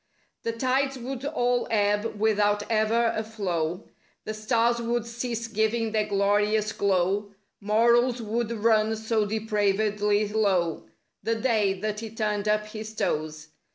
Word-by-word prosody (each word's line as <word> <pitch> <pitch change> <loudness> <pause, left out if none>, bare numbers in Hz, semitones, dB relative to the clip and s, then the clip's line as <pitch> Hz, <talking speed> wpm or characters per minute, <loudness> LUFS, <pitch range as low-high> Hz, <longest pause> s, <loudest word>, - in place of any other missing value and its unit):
The 230 - -2
tides 265 +3 0
would 255 +1 -6
all 245 -4 0
ebb 210 0 0
without 205 -1 +2
ever 225 +1 +2
a 220 - -1
flow; 180 -5 -3 0.4
The 215 - -3
stars 230 +2 +1
would 235 0 -1
cease 235 0 -4
giving 220 0 0
their 215 -1 0
glorious 205 +1 +1
glow; 200 +1 0 0.2
Morals 235 +4 +3
would 230 +1 -2
run 220 -1 +2
so 220 -1 0
depravedly 210 -1 +1
low— 190 -6 0 0.3
The 225 +3 0
day 220 -4 +1
that 210 0 -2
he 225 0 -6
turned 210 -2 -2
up 210 0 +2
his 215 0 -8
toes. 155 -2 -2
215 Hz, 135 wpm, -26 LUFS, 205-230 Hz, 0.4 s, Morals